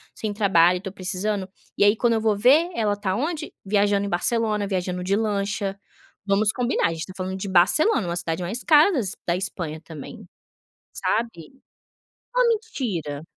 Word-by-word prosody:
sem 215 Hz, -2 st, -4 dB
trabalho, 180 Hz, -4 st, +4 dB
tô 190 Hz, -2 st, -6 dB
precisando, 195 Hz, +1 st, -3 dB, 0.3 s
e -, -, +4 dB
aí 205 Hz, +2 st, +5 dB
quando 235 Hz, 0 st, +2 dB
eu 220 Hz, -, 0 dB
vou 215 Hz, -2 st, +2 dB
ver 285 Hz, -, +5 dB
ela 215 Hz, -3 st, +1 dB
está 200 Hz, -2 st, -2 dB
onde 305 Hz, -, -3 dB
viajando 200 Hz, 0 st, +2 dB
em -, -, -3 dB
Barcelona, 210 Hz, +2 st, 0 dB
viajando 180 Hz, -2 st, -2 dB
de 195 Hz, +2 st, +1 dB
lancha, 200 Hz, -2 st, -2 dB, 0.5 s
vamos 205 Hz, +1 st, +2 dB
combinar 250 Hz, -4 st, 0 dB
a -, -, -3 dB
gente 160 Hz, -1 st, -5 dB
tá 185 Hz, -, -10 dB
falando 185 Hz, 0 st, -4 dB
de 190 Hz, -, -5 dB
Barcelona, 195 Hz, -, +3 dB
uma 170 Hz, -, -2 dB
cidade 170 Hz, 0 st, -3 dB
mais 210 Hz, +8 st, -4 dB
cara 315 Hz, +5 st, +6 dB
das 225 Hz, -, -2 dB
da 170 Hz, -, +2 dB
Espanha 175 Hz, -5 st, -4 dB
também 165 Hz, +7 st, -10 dB, 0.7 s
sabe. 225 Hz, -5 st, -2 dB, 0.8 s
Uma -, -, +4 dB
mentira. 230 Hz, -, -2 dB
200 Hz, 170 wpm, -23 LUFS, 185-225 Hz, 0.8 s, cara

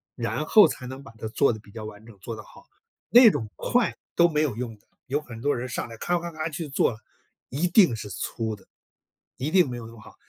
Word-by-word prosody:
然 120 Hz, +5 st, -2 dB
后 210 Hz, +6 st, +7 dB
才 125 Hz, -, -6 dB
能 130 Hz, +2 st, -8 dB
把 115 Hz, -, -12 dB
它 110 Hz, -, -5 dB
做 120 Hz, +2 st, +2 dB
得 110 Hz, -, -7 dB
比 105 Hz, -1 st, -18 dB
较 110 Hz, 0 st, -7 dB
完 110 Hz, 0 st, -10 dB
整， 115 Hz, -4 st, -14 dB
做 115 Hz, +4 st, -6 dB
得 110 Hz, -, -9 dB
好。 -, -, -17 dB, 0.4 s
那 235 Hz, +4 st, +9 dB
种 115 Hz, -, -3 dB
快 245 Hz, -2 st, +1 dB, 0.2 s
都 170 Hz, -, +6 dB
没 155 Hz, -2 st, +1 dB
有 140 Hz, -8 st, 0 dB
用 115 Hz, -2 st, -5 dB
的， -, -, -34 dB, 0.2 s
有 145 Hz, +3 st, 0 dB
很 120 Hz, -6 st, -10 dB
多 145 Hz, +2 st, +1 dB
人 125 Hz, +1 st, -4 dB
上 120 Hz, -, -3 dB
来 115 Hz, -1 st, -10 dB
咔 175 Hz, +8 st, 0 dB
咔 170 Hz, 0 st, -6 dB
咔 155 Hz, +1 st, -3 dB
去 155 Hz, +1 st, -5 dB
做， 125 Hz, -5 st, +1 dB, 0.5 s
一 150 Hz, +8 st, 0 dB
定 175 Hz, -, +5 dB
是 105 Hz, -2 st, -7 dB
粗 110 Hz, +3 st, -3 dB
的， 100 Hz, -, -20 dB, 0.7 s
一 145 Hz, +4 st, -2 dB
定 180 Hz, -5 st, +4 dB
没 120 Hz, -, -5 dB
有 115 Hz, -, -8 dB
那 115 Hz, -, -12 dB
么 110 Hz, -, -14 dB
好。 -, -, -15 dB
125 Hz, 270 characters per minute, -26 LUFS, 110-155 Hz, 0.7 s, 那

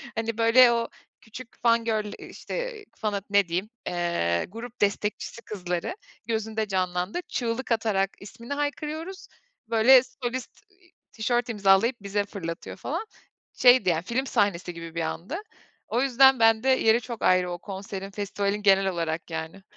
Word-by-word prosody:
hani 225 Hz, 0 st, -2 dB
böyle, 235 Hz, +2 st, +6 dB
o 230 Hz, 0 st, 0 dB, 0.3 s
küçük 230 Hz, +2 st, -12 dB
fan 230 Hz, -1 st, +3 dB
girl, 215 Hz, -2 st, -1 dB, 0.2 s
işte, -, -, -6 dB
fan'a 210 Hz, -3 st, -2 dB
ne 200 Hz, -2 st, +3 dB
diyeyim, 185 Hz, +5 st, -2 dB, 0.2 s
eee, 170 Hz, -, 0 dB
grup 230 Hz, +3 st, -9 dB
destekçisi 205 Hz, +2 st, -1 dB
kızları 180 Hz, -, -4 dB, 0.3 s
gözünde 220 Hz, -1 st, -2 dB
canlandı. 185 Hz, -, -1 dB
Çığlık 240 Hz, +1 st, -3 dB
atarak 210 Hz, -4 st, +1 dB
ismini 230 Hz, +6 st, -8 dB
haykırıyoruz, 305 Hz, +5 st, -4 dB, 0.4 s
böyle 240 Hz, +3 st, +7 dB
solist, 250 Hz, 0 st, -6 dB
iii, 375 Hz, -2 st, -28 dB, 0.2 s
tişört 240 Hz, +2 st, -1 dB
imzalayıp 205 Hz, +3 st, +3 dB
bize 205 Hz, 0 st, -1 dB
fırlatıyor 170 Hz, -5 st, -6 dB
falan. -, -, -4 dB, 0.5 s
Şeydi 250 Hz, -5 st, +6 dB
yani, 165 Hz, -1 st, 0 dB
film 245 Hz, +7 st, -1 dB
sahnesi 185 Hz, -6 st, 0 dB
gibi 165 Hz, -1 st, -9 dB
bir 165 Hz, -, -1 dB
andı. 170 Hz, -, -4 dB, 0.5 s
O 240 Hz, -, 0 dB
yüzden 265 Hz, 0 st, +5 dB
bende 225 Hz, +2 st, +4 dB
yeri 235 Hz, -3 st, +4 dB
çok 235 Hz, -1 st, -7 dB
ayrı 180 Hz, -1 st, +3 dB
o 175 Hz, -, -4 dB
konserin, 195 Hz, 0 st, -7 dB
festivalin 200 Hz, 0 st, -2 dB
genel 195 Hz, -1 st, +5 dB
olarak 165 Hz, -2 st, -3 dB
yani. 160 Hz, +4 st, -6 dB
220 Hz, 145 wpm, -26 LUFS, 190-245 Hz, 0.5 s, böyle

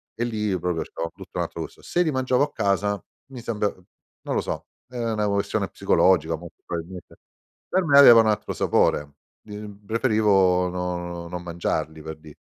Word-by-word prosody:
e 120 Hz, -, -2 dB
lì 105 Hz, -5 st, -1 dB
proprio 90 Hz, -1 st, -1 dB
c'era 85 Hz, -, -5 dB
tutto -, -, -10 dB
un'altro -, -, -3 dB
gusto. -, -, -8 dB
Se 175 Hz, -, 0 dB
li 155 Hz, -, 0 dB
mangiavo 130 Hz, 0 st, +2 dB
a -, -, -2 dB
casa 100 Hz, 0 st, 0 dB, 0.3 s
mi 125 Hz, -, -8 dB
sembra 105 Hz, -3 st, -1 dB, 0.6 s
non -, -, -2 dB
lo -, -, +2 dB
so, -, -, -5 dB, 0.2 s
è 125 Hz, -, -9 dB
una 110 Hz, -3 st, 0 dB
questione 100 Hz, 0 st, 0 dB
psicologica, 85 Hz, -3 st, +2 dB
molto 85 Hz, +1 st, -12 dB
probabilmente, 85 Hz, +1 st, -7 dB, 0.5 s
per 185 Hz, 0 st, +2 dB
me 140 Hz, -2 st, +5 dB
aveva 120 Hz, -5 st, +10 dB
un 110 Hz, -, +1 dB
altro 105 Hz, -, 0 dB
sapore, 75 Hz, -1 st, +1 dB, 0.3 s
di 105 Hz, -1 st, -10 dB
mhmm, 105 Hz, -1 st, -10 dB
preferivo 100 Hz, -6 st, +3 dB
no 90 Hz, -1 st, -4 dB
non 90 Hz, 0 st, -6 dB
mangiarli, 85 Hz, -2 st, -3 dB
per 80 Hz, 0 st, -7 dB
dire. 75 Hz, -1 st, -14 dB
100 Hz, 180 wpm, -24 LUFS, 85-110 Hz, 0.6 s, aveva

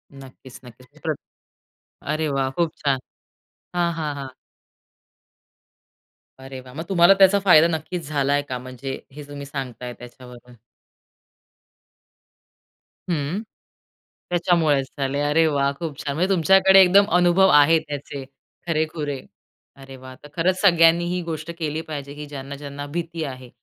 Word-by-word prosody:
नक्कीच-नक्कीच 130 Hz, -2 st, -15 dB
प्र -, -, 0 dB, 1.0 s
अरे 155 Hz, 0 st, -1 dB
वाह! 135 Hz, -1 st, 0 dB
खूप 165 Hz, +3 st, -1 dB
छान. 135 Hz, -2 st, +2 dB, 0.8 s
हां, 170 Hz, -1 st, +1 dB
हां, 155 Hz, -2 st, -3 dB
हां. 140 Hz, -1 st, -6 dB, 2.1 s
अरे 135 Hz, 0 st, -9 dB
वाह! 125 Hz, 0 st, -14 dB
मग 160 Hz, +3 st, -5 dB
तुम्हाला 180 Hz, 0 st, +6 dB
त्याचा 195 Hz, +1 st, +6 dB
फायदा 165 Hz, -4 st, +7 dB
नक्कीच 165 Hz, 0 st, -4 dB
झालाय 145 Hz, -1 st, +1 dB
का? 125 Hz, -, -3 dB
म्हणजे 130 Hz, +1 st, -7 dB
हे 145 Hz, +2 st, -10 dB
तुम्ही 145 Hz, -1 st, -8 dB
सांगताय 125 Hz, -3 st, -6 dB
त्याच्यावरून. 125 Hz, 0 st, -14 dB, 2.5 s
हं. 160 Hz, +4 st, -2 dB, 0.9 s
त्याच्यामुळेच 165 Hz, -6 st, +2 dB
झाले. 140 Hz, +1 st, -1 dB
अरे 150 Hz, +3 st, +3 dB
वाह 140 Hz, -2 st, +1 dB
खूप 155 Hz, -5 st, -5 dB
छान! 140 Hz, -1 st, -4 dB
म्हणजे 180 Hz, +5 st, 0 dB
तुमच्याकडे 190 Hz, +2 st, +5 dB
एकदम 195 Hz, +2 st, +6 dB
अनुभव 180 Hz, +2 st, +4 dB
आहे 150 Hz, +2 st, +6 dB
त्याचे 145 Hz, -2 st, -7 dB, 0.4 s
खरेखुरे. 155 Hz, -3 st, -2 dB, 0.6 s
अरे 135 Hz, -1 st, -12 dB
वाह! 130 Hz, 0 st, -12 dB
तर 145 Hz, -, -12 dB
खरंच 185 Hz, +2 st, +1 dB
सगळ्यांनी 170 Hz, -2 st, +5 dB
ही 180 Hz, -, -2 dB
गोष्ट 160 Hz, 0 st, -5 dB
केली 155 Hz, 0 st, -2 dB
पाहिजे 140 Hz, -2 st, -6 dB
की 150 Hz, 0 st, -7 dB
ज्यांना 140 Hz, -1 st, -7 dB
ज्यांना 145 Hz, 0 st, -7 dB
भीती 165 Hz, -1 st, -4 dB
आहे 130 Hz, -3 st, -7 dB
145 Hz, 130 wpm, -22 LUFS, 135-170 Hz, 2.5 s, फायदा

